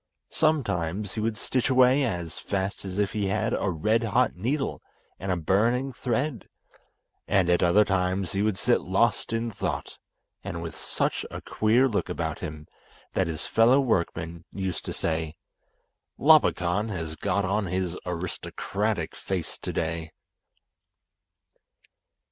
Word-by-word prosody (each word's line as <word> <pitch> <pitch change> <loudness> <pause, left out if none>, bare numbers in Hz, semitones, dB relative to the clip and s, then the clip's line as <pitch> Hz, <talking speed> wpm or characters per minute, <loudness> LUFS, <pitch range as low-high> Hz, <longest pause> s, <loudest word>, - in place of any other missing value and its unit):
Sometimes 100 - 0
he - - -3
would 110 0 -1
stitch 130 -2 0
away 130 +2 +5
as 85 -9 -3
fast 95 0 -2
as 95 0 -5
if 105 -1 +1
he 105 -2 -1
had 95 - 0
a 100 - 0
red 105 +7 +1
hot 115 +2 +2
needle 130 +10 -2 0.4
and 95 0 -2
a 90 - +1
burning 115 - +1
thread, 125 -1 -2 0.8
and 95 -3 +3
at 85 - +3
other 100 +5 +5
times 95 -1 0
he 100 - 0
would 105 -2 +1
sit - - +2
lost - - +1
in 115 0 -1
thought, - - -4 0.4
and 85 - -4
with 80 - -6
such - - -1
a - - -6
queer 115 +5 +3
look 105 -6 -1
about 80 -3 -3
him 75 -3 -6 0.5
that 95 - +1
his 80 -2 -3
fellow 120 +4 +5
workmen 85 -8 -1
used 95 -3 -3
to - - -3
say, 80 -1 -2 0.8
"Labakan 110 - +4
has 80 -5 -4
got 100 +4 0
on 100 +1 0
his 90 0 -1
aristocratic 90 0 -3
face 90 -4 -3
today." 80 0 -3
95 Hz, 140 wpm, -27 LUFS, 85-115 Hz, 0.8 s, away